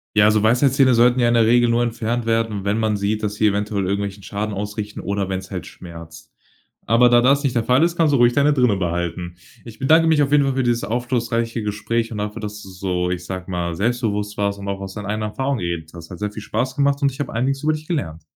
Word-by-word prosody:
Ja, 105 Hz, 0 st, +6 dB
so 110 Hz, 0 st, +2 dB
Weisheitszähne 130 Hz, +4 st, +4 dB
sollten 120 Hz, +2 st, +4 dB
ja 120 Hz, -, +3 dB
in 120 Hz, -, +2 dB
der 115 Hz, -, +4 dB
Regel 120 Hz, +1 st, +4 dB
nur 120 Hz, +1 st, +2 dB
entfernt 115 Hz, 0 st, -2 dB
werden, 115 Hz, -3 st, 0 dB
wenn 100 Hz, +2 st, 0 dB
man 110 Hz, -2 st, 0 dB
sieht, 105 Hz, +2 st, -1 dB
dass 105 Hz, 0 st, -2 dB
sie 110 Hz, -, +2 dB
eventuell 100 Hz, 0 st, -1 dB
irgendwelchen 100 Hz, +1 st, -3 dB
Schaden 105 Hz, +1 st, -4 dB
ausrichten 105 Hz, +1 st, -5 dB
oder 100 Hz, -1 st, -2 dB
wenn's 95 Hz, -1 st, -5 dB
halt -, -, -5 dB
schmerzt. 85 Hz, -2 st, -12 dB, 0.5 s
Aber 115 Hz, +3 st, +5 dB
da 120 Hz, 0 st, +5 dB
das 140 Hz, +3 st, +3 dB
nicht 135 Hz, -3 st, -1 dB
der 115 Hz, -2 st, +1 dB
Fall 125 Hz, +5 st, +4 dB
ist, 170 Hz, 0 st, 0 dB
kannst 160 Hz, -3 st, +3 dB
du -, -, +4 dB
ruhig 120 Hz, 0 st, +5 dB
deine 145 Hz, +3 st, +3 dB
drinne 125 Hz, -7 st, +2 dB
behalten. 85 Hz, -1 st, -3 dB, 0.3 s
Ich 115 Hz, -2 st, -11 dB
bedanke 160 Hz, +5 st, +4 dB
mich 155 Hz, -2 st, +4 dB
auf 140 Hz, -, -2 dB
jeden 145 Hz, -1 st, +5 dB
Fall 135 Hz, -, 0 dB
für 130 Hz, -, +1 dB
dieses 120 Hz, -1 st, 0 dB
aufschlussreiche 115 Hz, 0 st, -1 dB
Gespräch 115 Hz, +3 st, -2 dB
und 110 Hz, -, -5 dB
dafür, 105 Hz, 0 st, -4 dB
dass 105 Hz, 0 st, -6 dB
du 95 Hz, -, -11 dB
so, 90 Hz, -1 st, -2 dB
ich 90 Hz, -1 st, -4 dB
sag 90 Hz, 0 st, -6 dB
mal, 85 Hz, -2 st, -2 dB
selbstbewusst 105 Hz, -1 st, -1 dB
warst 100 Hz, -1 st, -1 dB
und 100 Hz, -, -7 dB
auch 100 Hz, 0 st, -3 dB
aus 95 Hz, -1 st, -7 dB
deinen 105 Hz, -, -7 dB
eigenen 105 Hz, +1 st, -2 dB
Erfahrungen 135 Hz, +3 st, -2 dB
geredet 85 Hz, -3 st, -4 dB
hast. 85 Hz, -1 st, -11 dB
Hat 90 Hz, -, -9 dB
sehr 105 Hz, 0 st, -3 dB
viel 105 Hz, -, -8 dB
Spaß 130 Hz, +5 st, -2 dB
gemacht 140 Hz, 0 st, +1 dB
und 140 Hz, -1 st, +2 dB
ich 135 Hz, -, -13 dB
habe 145 Hz, -, -4 dB
einiges 135 Hz, +4 st, -1 dB
über 155 Hz, +1 st, +2 dB
dich 155 Hz, 0 st, -7 dB
gelernt. 85 Hz, -, -3 dB
110 Hz, 250 wpm, -21 LUFS, 100-125 Hz, 0.5 s, Ja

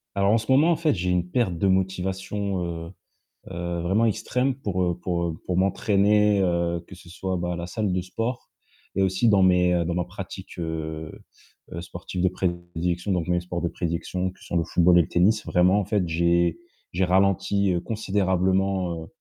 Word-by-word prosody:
Alors, 100 Hz, 0 st, +2 dB
en -, -, +5 dB
ce 110 Hz, +3 st, -5 dB
moment, 150 Hz, +6 st, +5 dB
en 170 Hz, -, +3 dB
fait, 155 Hz, -1 st, +1 dB
j'ai 90 Hz, -1 st, -2 dB
une 90 Hz, -1 st, 0 dB
perte 95 Hz, -4 st, 0 dB
de 90 Hz, -, 0 dB
motivation, 95 Hz, +1 st, -1 dB
heu 85 Hz, -1 st, -5 dB, 0.6 s
heu, 85 Hz, 0 st, -3 dB
vraiment 95 Hz, +7 st, +2 dB
extrême 125 Hz, +4 st, 0 dB
pour, 100 Hz, -8 st, -2 dB
heu 85 Hz, -1 st, 0 dB
pour, 85 Hz, -1 st, -2 dB
heu, 85 Hz, -, -2 dB
pour 90 Hz, -, -1 dB
m'entraîner, 100 Hz, +1 st, +3 dB
heu, 85 Hz, -2 st, 0 dB
que 95 Hz, -, -11 dB
ce 90 Hz, -1 st, -15 dB
soit, 95 Hz, +1 st, -3 dB
bah, 90 Hz, 0 st, -2 dB
à -, -, -3 dB
la 85 Hz, 0 st, -5 dB
salle 105 Hz, 0 st, -1 dB
de 90 Hz, -, 0 dB
sport 115 Hz, +7 st, -4 dB, 0.5 s
et 95 Hz, -, +2 dB
aussi 95 Hz, +5 st, +2 dB
dans 100 Hz, -3 st, +5 dB
mes, 90 Hz, -1 st, +4 dB
heu, 85 Hz, -1 st, +1 dB
dans 85 Hz, -, -1 dB
ma 90 Hz, 0 st, 0 dB
pratique, 95 Hz, +1 st, -9 dB
heu 80 Hz, -2 st, -4 dB, 0.6 s
heu, 85 Hz, -, -5 dB
sportive 90 Hz, +1 st, -5 dB
de 90 Hz, -, +4 dB
prédilection, 85 Hz, 0 st, -2 dB
donc 90 Hz, -3 st, 0 dB
mes 90 Hz, 0 st, +2 dB
sports 90 Hz, 0 st, -5 dB
de 85 Hz, -, 0 dB
prédilection 90 Hz, +2 st, -3 dB
que 95 Hz, -, -23 dB
sont 85 Hz, -, -2 dB
le 85 Hz, -, +2 dB
football 85 Hz, +2 st, +4 dB
et -, -, +7 dB
le -, -, -9 dB
tennis, 105 Hz, +5 st, +2 dB
vraiment, 90 Hz, +3 st, +3 dB
en 100 Hz, -, -2 dB
fait, 100 Hz, -3 st, 0 dB
j'ai 85 Hz, +1 st, +2 dB, 0.3 s
j'ai 90 Hz, +2 st, 0 dB
ralenti, 95 Hz, +1 st, +2 dB
heu, 85 Hz, -, -1 dB
considérablement, 95 Hz, -4 st, 0 dB
heu -, -, -11 dB
90 Hz, 205 wpm, -25 LUFS, 85-100 Hz, 0.6 s, et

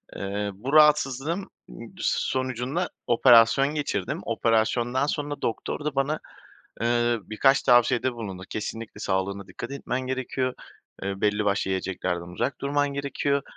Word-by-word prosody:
Eee, 100 Hz, +1 st, -3 dB
bu 125 Hz, +9 st, -5 dB
rahatsızlığım 150 Hz, +3 st, +3 dB, 0.2 s
d -, -, -10 dB
sonucunda 130 Hz, +6 st, -1 dB, 0.2 s
operasyon 120 Hz, +2 st, +6 dB
geçirdim. 105 Hz, -10 st, -2 dB
Operasyondan 115 Hz, +3 st, +1 dB
sonra 145 Hz, 0 st, -3 dB
doktor 145 Hz, +5 st, -3 dB
da 150 Hz, -2 st, -2 dB
bana, 140 Hz, +3 st, 0 dB, 0.6 s
ııı, 120 Hz, -1 st, +2 dB
birkaç 135 Hz, +5 st, +3 dB
tavsiyede 120 Hz, +1 st, +4 dB
bulundu. 95 Hz, -5 st, -6 dB
Kesinlikle 110 Hz, 0 st, -5 dB
sağlığına 95 Hz, 0 st, -2 dB
dikkat 120 Hz, +7 st, -8 dB
etmen 130 Hz, -2 st, -3 dB
gerekiyor, 130 Hz, 0 st, -2 dB, 0.5 s
eee, 100 Hz, 0 st, -3 dB
belli 105 Hz, 0 st, +1 dB
başlı 100 Hz, -1 st, 0 dB
yiyeceklerden 90 Hz, -2 st, -3 dB
uzak 140 Hz, -, -2 dB
durman 145 Hz, +1 st, +1 dB
gerekiyor, 140 Hz, 0 st, -1 dB
120 Hz, 125 wpm, -26 LUFS, 105-140 Hz, 0.6 s, operasyon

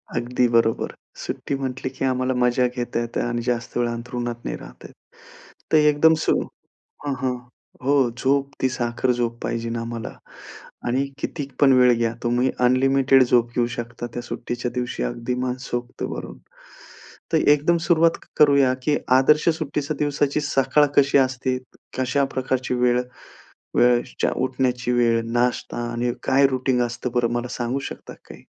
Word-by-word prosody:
अगदी 120 Hz, +1 st, +1 dB
बरोबर, 115 Hz, -1 st, +1 dB, 0.3 s
सुट्टी 140 Hz, -, -3 dB
म्हटली, 130 Hz, -1 st, -4 dB
की 135 Hz, 0 st, -3 dB
आम्हाला 130 Hz, 0 st, 0 dB
मजा 125 Hz, +1 st, +3 dB
घेता 120 Hz, -1 st, -3 dB
येत 120 Hz, 0 st, -5 dB
आणि 120 Hz, 0 st, -1 dB
जास्त 120 Hz, -1 st, -2 dB
वेळ 120 Hz, 0 st, +1 dB
अंथरुणात 120 Hz, 0 st, -5 dB
नाही -, -, -3 dB
राहता -, -, -12 dB
येत, -, -, -18 dB, 0.8 s
तर 155 Hz, -, +6 dB
एकदम, 150 Hz, +1 st, +5 dB
सो -, -, +3 dB, 0.7 s
हां, 145 Hz, -, -1 dB
हां, 130 Hz, -1 st, 0 dB, 0.5 s
हो, 140 Hz, +2 st, +3 dB, 0.2 s
झोप 140 Hz, +2 st, +1 dB
ती 130 Hz, -, +2 dB
साखर 120 Hz, 0 st, -1 dB
झोप 120 Hz, -1 st, -1 dB
पाहिजेलं 115 Hz, 0 st, -2 dB
आम्हाला 115 Hz, -1 st, -5 dB, 0.7 s
आणि 130 Hz, +3 st, +1 dB
किती 145 Hz, -1 st, -4 dB
पण 135 Hz, -2 st, +6 dB
वेळ 125 Hz, -1 st, +6 dB
घ्या 115 Hz, -1 st, 0 dB
तुम्ही, 120 Hz, +2 st, +1 dB, 0.2 s
अनलिमिटेड 135 Hz, +1 st, +4 dB
झोप 120 Hz, -1 st, +2 dB
घेऊ 120 Hz, -, +3 dB
शकता 120 Hz, 0 st, -5 dB
त्या 120 Hz, -, -4 dB
सुट्टीच्या 120 Hz, 0 st, -4 dB
दिवशी, 125 Hz, -, -2 dB
अगदी 115 Hz, -, -3 dB
मनसोक्त 125 Hz, -1 st, -4 dB
भरून. -, -, -5 dB, 1.0 s
तर -, -, +5 dB
एकदम 150 Hz, +4 st, +4 dB
सुरुवात 165 Hz, -1 st, +4 dB, 0.2 s
करूया, 140 Hz, -3 st, +5 dB
की 150 Hz, +1 st, +2 dB, 0.2 s
आदर्श 150 Hz, +5 st, +4 dB
सुट्टीच्या 150 Hz, -1 st, -3 dB
दिवसाची 145 Hz, 0 st, 0 dB
सकाळ 140 Hz, 0 st, +3 dB
कशी 140 Hz, 0 st, +5 dB
असते, 130 Hz, -1 st, +1 dB, 0.4 s
कशा 130 Hz, +2 st, +1 dB
प्रकारची 130 Hz, -1 st, -1 dB
वेळ 125 Hz, 0 st, +2 dB, 0.8 s
वेळच्या 120 Hz, 0 st, +2 dB
उठण्याची 125 Hz, -1 st, 0 dB
वेळ, 120 Hz, -1 st, +3 dB
नाश्ता 120 Hz, +1 st, 0 dB, 0.2 s
आणि 120 Hz, +1 st, -1 dB
काय 135 Hz, +1 st, +4 dB
रूटीन 130 Hz, -1 st, 0 dB
असतं, 120 Hz, +1 st, -3 dB
बरं, 120 Hz, -1 st, +1 dB
मला 120 Hz, +1 st, -2 dB
सांगू 120 Hz, +2 st, -1 dB
शकता -, -, -9 dB, 0.2 s
काही? -, -, -12 dB
125 Hz, 150 wpm, -23 LUFS, 120-135 Hz, 1.0 s, तर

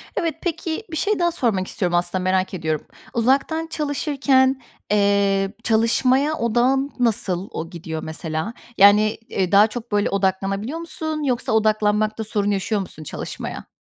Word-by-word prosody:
Evet. 330 Hz, -3 st, -1 dB
Peki, 330 Hz, +1 st, -3 dB
bir 320 Hz, -, -3 dB
şey 420 Hz, +3 st, +1 dB
daha 345 Hz, -1 st, +2 dB
sormak 220 Hz, -, 0 dB
istiyorum 175 Hz, -3 st, -1 dB
aslında, 175 Hz, +1 st, 0 dB
merak 185 Hz, +1 st, +1 dB
ediyorum. 160 Hz, -4 st, -2 dB, 0.3 s
Uzaktan 275 Hz, +7 st, +1 dB
çalışırken, 275 Hz, -4 st, +1 dB, 0.3 s
eee, 200 Hz, -1 st, +2 dB
çalışmaya 255 Hz, +6 st, +2 dB
odağın 250 Hz, +4 st, +1 dB
nasıl 200 Hz, -5 st, 0 dB
o 165 Hz, -, -5 dB
gidiyor, 160 Hz, -2 st, -6 dB
mesela? 160 Hz, +6 st, -3 dB, 0.2 s
Yani, 210 Hz, +2 st, +6 dB
eee, 185 Hz, -2 st, -1 dB
daha 205 Hz, +2 st, +7 dB
çok, 235 Hz, 0 st, -8 dB
böyle, 205 Hz, 0 st, +2 dB
odaklanabiliyor 195 Hz, -, -1 dB
musun 315 Hz, -2 st, -4 dB
yoksa 250 Hz, -4 st, -1 dB
odaklanmakta 215 Hz, 0 st, +1 dB
sorun 205 Hz, -1 st, 0 dB
yaşıyor 200 Hz, +1 st, 0 dB
musun 155 Hz, -4 st, -9 dB
çalışmaya? -, -, -6 dB
215 Hz, 140 wpm, -22 LUFS, 195-270 Hz, 0.3 s, daha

